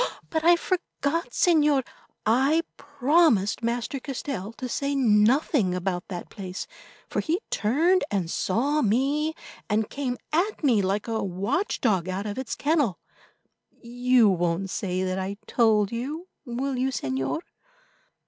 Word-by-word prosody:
But 320 -1 0
I 345 +1 +7
forgot, 335 -3 -2
Señor; 300 -6 +3 0.4
I 270 +9 +3
promised 280 - +2
Master 235 +3 -2
Castell 260 -6 -5
to 255 - -6
say 280 +3 -1
nothing 225 - +3
about 180 -1 -2
that 180 -3 -6
place, 190 -3 -6 0.4
for - - -2
he 335 +3 0
turned 320 - +2
and 190 -4 -1
saw 265 - 0
me, 280 +8 +1 0.3
and 215 0 0
came 260 -3 -2 0.2
at 365 +4 0
me 240 -8 +4
like 195 +3 -1
a 225 -1 -1
watchdog 200 - 0
out 190 +2 -3
of 210 +4 -4
its 260 - -4
kennel. 285 - +1 0.8
You 245 0 +3
won't 180 0 0
say 185 -1 -2
that 185 0 -1
I 195 +2 -4
told 215 -4 +3
you, 290 +9 -4 0.2
will 255 +2 -2
you, 260 +1 +1
Señor?" 135 - -2
240 Hz, 135 wpm, -26 LUFS, 200-290 Hz, 0.8 s, I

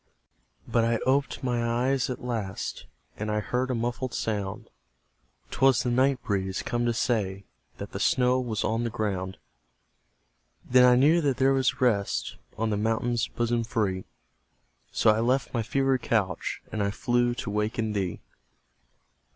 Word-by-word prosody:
But 115 - +2
I 115 0 +2
oped 135 +1 +1
my 120 -2 0
eyes 125 +3 +1
at 125 - -5
last, 110 -6 -4 0.3
And 105 +1 -3
I 105 0 +1
heard 125 +4 -1
a 130 - 0
muffled 120 +2 -2
sound; 105 +1 -3 0.8
'Twas 135 -2 +3
the 125 - 0
night 130 +1 +2
breeze, 95 -2 -2
come 120 0 -1
to - - +3
say 100 -6 -1 0.3
That - - -7
the - - -5
snow 125 0 +3
was 115 -4 -2
on 115 +2 0
the 120 - -1
ground. 95 -4 -3 1.3
Then 125 0 +6
I 125 0 +6
knew 150 +7 +5
that 140 -4 +1
there 135 +1 +4
was 130 -1 +1
rest 105 -6 +1 0.2
On 110 0 0
the 105 - 0
mountain's 115 +2 0
bosom 120 0 -1
free; 105 -5 -1 0.9
So 110 - +4
I 110 - +1
left 125 +2 +1
my 115 - +1
fevered 135 +2 +1
couch, 100 -5 -1
And 110 - -2
I 100 - +1
flew 120 +3 +1
to 115 - -4
waken 105 +1 -1
thee! 95 -4 -2
120 Hz, 160 wpm, -27 LUFS, 105-125 Hz, 1.3 s, Then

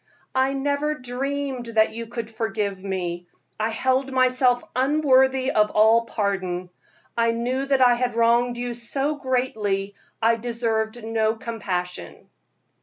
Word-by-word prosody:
I 265 +1 +2
never 285 +2 0
dreamed 265 0 -3
that 220 0 +4
you 230 0 -6
could 230 -1 -6
forgive 205 -3 -3
me; 175 -3 -3 0.3
I 215 +1 +1
held 260 +4 0
myself 255 -1 +3
unworthy 265 -1 +3
of 210 0 +3
all 220 +2 +4
pardon. 185 -5 -2 0.4
I 230 0 +2
knew 255 +4 -2
that 270 -1 +2
I 245 -1 +7
had 245 -1 -1
wronged 235 +1 +3
you 245 0 -3
so 270 +5 -2
greatly, 220 -7 -1 0.3
I 230 0 +3
deserved 230 -1 -2
no 220 0 0
compassion." 190 -6 -5
235 Hz, 130 wpm, -24 LUFS, 220-260 Hz, 0.4 s, I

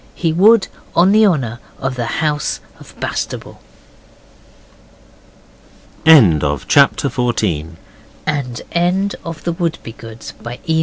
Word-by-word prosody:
He 165 -3 0
would, 205 +5 +5 0.3
on 180 +3 +5
the 215 +1 +5
honour 125 - -1 0.2
of 135 -1 -3
the 120 -2 -3 0.2
House 150 -1 -1 0.2
of - - -16
Bastable. - - -4 2.5
End 105 - +7
of 75 -1 -1
the - - -16
Project 140 -1 +4
Gutenberg 100 - -1 0.5
EBook 170 +8 -1
of 165 -2 -7
The 170 - -1
Wouldbegoods, 115 - -6
by 120 +1 -7
E. 160 -2 +1
145 Hz, 115 wpm, -17 LUFS, 115-170 Hz, 2.5 s, End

